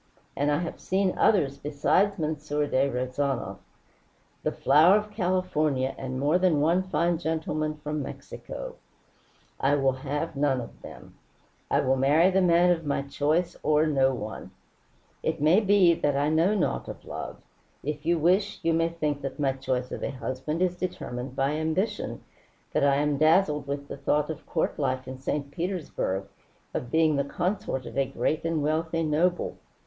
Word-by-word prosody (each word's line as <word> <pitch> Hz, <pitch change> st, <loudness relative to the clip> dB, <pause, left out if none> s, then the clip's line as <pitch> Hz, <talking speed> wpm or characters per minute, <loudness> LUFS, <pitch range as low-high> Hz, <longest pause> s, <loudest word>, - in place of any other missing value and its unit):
And 145 Hz, +1 st, +1 dB
I 145 Hz, -, +2 dB
have 170 Hz, -, -5 dB
seen 190 Hz, 0 st, 0 dB
others 140 Hz, -10 st, +2 dB
besides 180 Hz, +7 st, +1 dB
M. 155 Hz, 0 st, 0 dB
de 145 Hz, -2 st, 0 dB
Rezanov 130 Hz, +1 st, -2 dB, 0.8 s
the -, -, 0 dB
flower 165 Hz, +6 st, +5 dB
of 210 Hz, 0 st, -4 dB
California 175 Hz, -, 0 dB
and 130 Hz, -1 st, -5 dB
more 150 Hz, +6 st, +2 dB
than 180 Hz, -5 st, +3 dB
one 165 Hz, +5 st, +3 dB
fine 175 Hz, -2 st, 0 dB
gentleman 155 Hz, -2 st, -2 dB
from 150 Hz, 0 st, -4 dB
Mexico. -, -, -8 dB, 0.8 s
I 140 Hz, +2 st, +3 dB
will 135 Hz, -2 st, +3 dB
have 145 Hz, +4 st, -4 dB
none 140 Hz, -2 st, +1 dB
of 120 Hz, -, -9 dB
them. -, -, -12 dB, 0.6 s
I -, -, +3 dB
will 130 Hz, +1 st, +2 dB
marry 150 Hz, +7 st, +4 dB
the 190 Hz, +1 st, +3 dB
man 175 Hz, 0 st, +5 dB
of 165 Hz, -2 st, 0 dB
my 140 Hz, -2 st, -1 dB
choice 155 Hz, +5 st, 0 dB
or 155 Hz, 0 st, +3 dB
no 135 Hz, -3 st, +3 dB
one. 110 Hz, -4 st, -6 dB, 0.7 s
It 160 Hz, 0 st, -1 dB
may 155 Hz, +7 st, +5 dB
be 200 Hz, -4 st, +5 dB
that 145 Hz, -3 st, 0 dB
I 145 Hz, +1 st, +2 dB
know 165 Hz, +7 st, +3 dB
naught 195 Hz, -, -1 dB
of -, -, -9 dB
love. -, -, -6 dB, 0.5 s
If 150 Hz, +1 st, -4 dB
you 170 Hz, +2 st, +2 dB
wish, 185 Hz, +6 st, +2 dB
you 165 Hz, -, +2 dB
may 165 Hz, 0 st, +2 dB
think 150 Hz, -4 st, -2 dB
that 135 Hz, +2 st, -5 dB
my 140 Hz, -2 st, +2 dB
choice 130 Hz, -1 st, -3 dB
of -, -, -5 dB
a -, -, -2 dB
husband 135 Hz, +6 st, -3 dB
is 180 Hz, -1 st, +1 dB
determined 130 Hz, -8 st, -5 dB
by 135 Hz, +1 st, +1 dB
ambition, 160 Hz, +7 st, -2 dB, 0.5 s
that -, -, +2 dB
I 140 Hz, -1 st, +4 dB
am 145 Hz, 0 st, +1 dB
dazzled 155 Hz, -2 st, +3 dB
with 140 Hz, 0 st, -4 dB
the -, -, -7 dB
thought 150 Hz, +2 st, 0 dB
of 160 Hz, -, -9 dB
court 160 Hz, -, -1 dB
life 130 Hz, -2 st, -1 dB
in 130 Hz, 0 st, -7 dB
St. 140 Hz, +1 st, -3 dB
Petersburg, 165 Hz, -, -2 dB, 0.5 s
of 120 Hz, -, -3 dB
being 160 Hz, -1 st, +3 dB
the 140 Hz, -, +2 dB
consort 175 Hz, -4 st, -2 dB
of -, -, -8 dB
a 135 Hz, -, +2 dB
great 150 Hz, +3 st, -1 dB
and 165 Hz, -2 st, 0 dB
wealthy 160 Hz, +2 st, 0 dB
noble. 165 Hz, +4 st, 0 dB
150 Hz, 175 wpm, -27 LUFS, 140-170 Hz, 0.8 s, flower